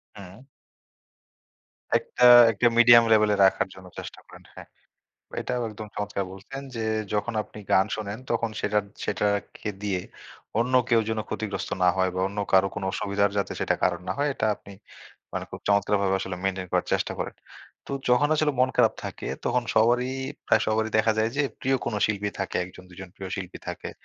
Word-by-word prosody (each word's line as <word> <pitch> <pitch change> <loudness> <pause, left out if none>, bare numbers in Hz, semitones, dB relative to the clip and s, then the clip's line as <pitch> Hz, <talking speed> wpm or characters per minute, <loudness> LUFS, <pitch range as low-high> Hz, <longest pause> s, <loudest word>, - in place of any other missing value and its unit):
হুম। 100 +6 -12 1.5
একটা, 125 - 0 0.3
একটা 115 +3 +2
মিডিয়াম 120 0 +8
লেভেলে 105 -1 +5
রাখার 95 - +2
জন্য 95 -1 -13
চেষ্টা - - -8
করেন, - - -15
হ্যাঁ। - - -11 0.7
এটাও 125 -1 -2
একদম 105 0 -8
চমৎকার 100 -1 -3
বলছেন 135 +9 -8
যে, 110 - -2 0.3
যখন 110 +3 -1
আপনি 105 - -14
গান 95 +2 +5
শোনেন 105 0 -5
তখন 115 -1 0
সেটার 105 0 +1 0.2
সেটার 105 0 0
একে 105 - -7
দিয়ে 95 -3 -1 0.6
অন্য 125 +2 0
কেউ 115 -2 +4
যেন 110 -1 -1
ক্ষতিগ্রস্ত 105 -2 -4
না - - +6
হয় 95 -1 +2
বা 95 - -1
অন্য 100 +1 -8
কারো 95 0 +6
কোন 100 - -5
অসুবিধার 100 0 0
যাতে 100 - -1
সেটা - - +1
কারণ 90 -1 +1
না - - +1
হয় 145 +1 +1
এটা - - -1
আপনি 100 - -14 0.6
মানে - - -2
খুব - - -7
চমৎকারভাবে 100 -1 +2
আসলে 95 -1 -4
মেইনটেইন 95 -1 -2
করার - - +1
চেষ্টা - - 0
করেন। - - -4 0.5
তো - - -6 0.2
যখন 125 +4 +4
আসলে 150 -1 +1
মন 130 - +4
খারাপ 115 -3 +4
থাকে - - -6 0.2
তখন 125 0 +1
সবারই 120 +3 +3 0.4
প্রায় 110 - +4
সবারই 110 0 0
দেখা 110 0 +3
যায় 110 +1 +2
যে, 145 - +3 0.2
প্রিয় 135 0 +2
কোন 120 - -2
শিল্পী 105 -1 -2
থাকে 95 - -2
১ - - -10
জন 90 - -13
২ 90 - -16
জন 95 - -8
প্রিয় 95 -1 -6
শিল্পী 95 -1 -6
থাকে - - -5
105 Hz, 185 wpm, -26 LUFS, 95-115 Hz, 1.5 s, মিডিয়াম